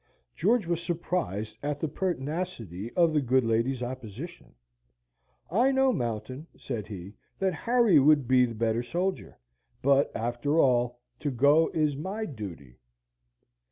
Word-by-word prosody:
George 235 -5 +2
was 170 0 -1
surprised 160 - -3
at 145 0 -2
the 160 - -1
pertinacity 145 - -3
of 170 -2 +4
the 150 - +3
good 130 0 +2
lady's 115 +3 0
opposition. 130 - -8 1.0
"I 240 +9 +3
know, 265 -1 +3
Mountain," 130 - -4
said 115 -6 -5
he, 100 -2 -8 0.2
"that 190 -1 0
Harry 230 -1 +4
would 145 -2 +4
be 125 0 +5
the 115 - -7
better 115 +1 0
soldier; 180 +9 -3 0.5
but, 140 +1 +4
after 120 +6 -1
all, 120 -4 +2 0.2
to 150 - -1
go 145 +5 +4
is 150 -3 +1
my 190 +9 -4
duty." 85 - -9
140 Hz, 135 wpm, -28 LUFS, 115-170 Hz, 1.0 s, be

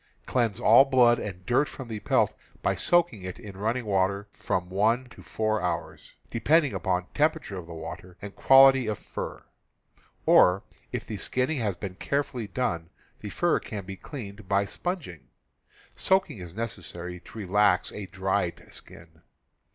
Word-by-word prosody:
Cleanse 115 -6 0
all 115 +5 +7
blood 125 -3 +5
and 95 -3 -7
dirt 130 +5 +2
from 130 - -8
the 110 -2 -5
pelt - - +2 0.3
by - - +2
soaking 170 - +2
it 90 0 -6
in 100 -3 -10
running 110 +5 -1
water 100 0 0
from 90 -1 -2
one 110 +7 +1
to - - -14
four 110 -1 -1
hours, 85 -2 -4 0.2
depending 145 +4 +3
upon 90 -1 -1
temperature 155 -8 0
of 85 - -10
water 85 +2 -8
and 100 0 -9
quality 135 -2 +6
of 105 -2 -1
fur; - - -7 0.8
or, 90 +2 +5 0.3
if - - -4
the - - -5
skinning 130 +3 0
has 100 -6 -1
been 95 +1 -5
carefully 125 +1 -2
done, 85 -7 -2 0.3
the - - -6
fur - - +1
can 100 -3 -7
be 95 0 -6
cleaned 105 -3 -9
by 100 0 +3
sponging. 150 - -5 0.7
Soaking 190 - +1
is 90 -1 -9
necessary 90 -6 -5
to 100 - -14
relax 100 -1 +2
a 105 -2 -7
dried 95 -2 -2
skin. - - -14
105 Hz, 155 wpm, -27 LUFS, 95-125 Hz, 0.8 s, all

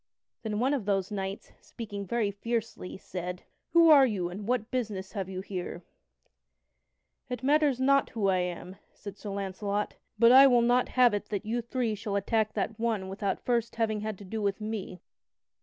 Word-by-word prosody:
Then 215 -2 -3
one 260 +5 +2
of 260 -8 -2
those 195 -2 0
knights, 195 -1 -5
speaking 205 -4 -7
very 220 -1 0
fiercely, 225 -2 -4
said: 180 -1 -6 0.3
"Who 335 -1 +7
are 275 -3 +8
you, 190 -6 -2
and 200 +3 -7
what 240 -2 -1
business 215 -7 -3
have 195 -3 -4
you 185 -1 -5
here?" 180 -2 -6 1.5
"It 250 -1 -5
matters 290 -2 +3
not 275 +1 +3
who 215 -4 -1
I 190 -1 +3
am," 180 +1 -4 0.2
said 200 -1 -9
Sir 210 - -7
Launcelot, 200 +1 -3 0.2
"but 230 +2 +6
I 270 +2 +9
will 245 -2 +4
not 245 +1 +3
have 245 -3 +6
it 205 0 -2
that 210 0 -3
you 235 +3 -1
three 235 -1 -2
shall 205 -1 -4
attack 215 +2 0
that 215 +2 -3
one 220 -5 -1
without 195 0 -3
first 235 -2 0
having 220 -2 0
had 215 -2 -4
to 200 - -11
do 220 +3 -4
with 200 0 -1
me." 210 -4 -5
215 Hz, 185 wpm, -29 LUFS, 195-235 Hz, 1.5 s, I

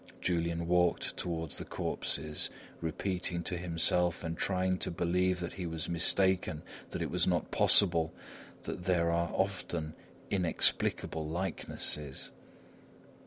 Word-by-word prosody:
Julian 85 -1 -1
walked 90 0 +1
toward 80 -3 -4
the - - -3
corpses, 75 -1 -1 0.3
repeating 85 +1 -2
to 90 - -1
himself 90 0 +1
and 80 0 -3
trying 95 +1 0
to - - 0
believe 90 +1 0
that 85 - -4
he 90 -3 -5
was 80 -1 -4
mistaken, 90 -1 +1 0.3
that - - -3
it - - -4
was - - +1
not - - 0
possible, 85 -4 +5 0.5
that 90 - -6
there 85 -3 +2
are 85 0 0
often 90 -5 -2 0.4
inexplicable 85 -3 +3
likenesses. 75 -4 -1
85 Hz, 120 wpm, -31 LUFS, 80-90 Hz, 0.5 s, possible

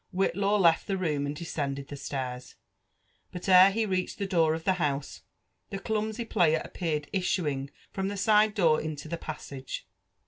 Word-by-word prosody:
Whitlaw 195 +2 +1
left 170 -3 +4
the 195 - 0
fb6m 155 -6 -1
and 145 - -3
descended 140 -4 -4
(he - - -4
stairs; 130 -3 -5 0.8
but 180 +1 -7
ere 185 0 +8
he 220 +3 0
reached 185 -3 -2
the 200 - -2
door 165 -5 +2
of 160 - -6
the 190 - +3
house, 145 -2 -2 0.5
the 195 - -4
clumpy 220 +3 -2
player 160 -7 +3
appeared 155 -5 -3
issuing 150 -8 -1 0.2
from 190 0 -2
the 200 0 -4
side 215 +1 +4
door 165 -6 +4
intd 155 0 -6
the 170 - -1
passage. 140 -4 -7
170 Hz, 170 wpm, -28 LUFS, 145-195 Hz, 0.8 s, ere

